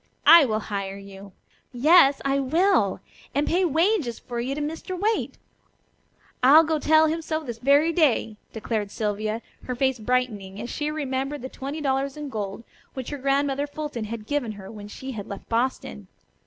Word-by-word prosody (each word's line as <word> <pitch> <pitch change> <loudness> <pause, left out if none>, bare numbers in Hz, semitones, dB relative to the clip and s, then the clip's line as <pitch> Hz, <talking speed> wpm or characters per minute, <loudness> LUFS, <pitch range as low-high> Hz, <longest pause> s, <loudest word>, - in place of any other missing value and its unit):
I 335 -3 +9
will 215 -3 -1
hire 195 -2 -4
you! 195 0 -12 0.4
Yes, 280 +2 +5
I 275 0 +2
will; 305 - +2 0.3
and 285 +1 +2
pay 360 +3 +1
wages 330 - +1
for 240 -2 -6
you 260 +3 -2
to - - -4
Mr. 325 +5 -5
Waite. 435 +3 -1 1.0
I'll 285 +6 +8
go 315 -1 0
tell 315 +1 +5
him 320 +1 -1
so 315 0 -3
this 235 -5 -6
very 285 +6 +4
day," 260 -9 +2
declared 215 -2 -3
Sylvia, 215 +2 -3 0.2
her 250 - -3
face 265 0 0
brightening, 215 -5 -2
as 240 +3 -5
she 295 0 -2
remembered 275 -2 -3
the 260 - -5
twenty 280 +4 -6
dollars 270 0 -1
in 295 -1 -5
gold 210 -2 -5 0.3
which 260 0 -5
her 290 - -5
Grandmother 275 +1 0
Fulton 290 -6 -5
had 220 0 -6
given 275 -6 -2
her 195 -2 -10
when 205 -2 -9
she 265 +5 -7
had 210 -5 -7
left 200 - -8
Boston. 230 - -2
265 Hz, 175 wpm, -25 LUFS, 220-300 Hz, 1.0 s, I